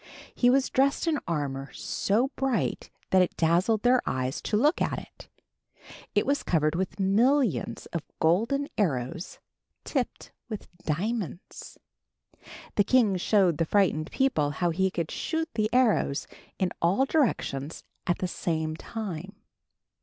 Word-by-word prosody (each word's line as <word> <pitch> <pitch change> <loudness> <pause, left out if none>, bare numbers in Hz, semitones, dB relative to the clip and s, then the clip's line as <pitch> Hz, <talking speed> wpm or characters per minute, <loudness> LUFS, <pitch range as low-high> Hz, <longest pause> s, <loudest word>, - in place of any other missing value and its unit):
He 245 - +3
was 270 +1 +3
dressed 275 +4 +2
in 315 -3 +1
armor 140 -4 -3
so 230 +7 0
bright 270 -4 -1 0.2
that 190 - +6
it 180 - 0
dazzled 180 +7 +2
their 245 +1 +4
eyes 130 +1 -2
to 210 - 0
look 300 - +3
at - - 0
it. - - -11 0.9
It - - +3
was 285 +1 +1
covered 155 -3 +1
with 180 +1 -3
millions 205 - +2
of 170 - -1 0.2
golden 230 - +2
arrows 160 - -1 0.5
tipped 260 -5 -3 0.2
with 210 -5 -7
diamonds. 185 +3 -4 1.0
The 205 - +6
king 225 -3 +3
showed 180 -4 +2
the 165 - +2
frightened 160 -4 +2
people 255 - +1
how 170 +4 0
he 190 +3 +1
could 170 -3 -3
shoot 320 -1 -2
the 215 -1 0
arrows 235 - +2 0.3
in 185 -2 0
all 190 +11 +3
directions 170 - -1 0.2
at 175 - +2
the 185 - -2
same 160 -3 -2
time. 195 -2 -6
190 Hz, 140 wpm, -27 LUFS, 165-245 Hz, 1.0 s, that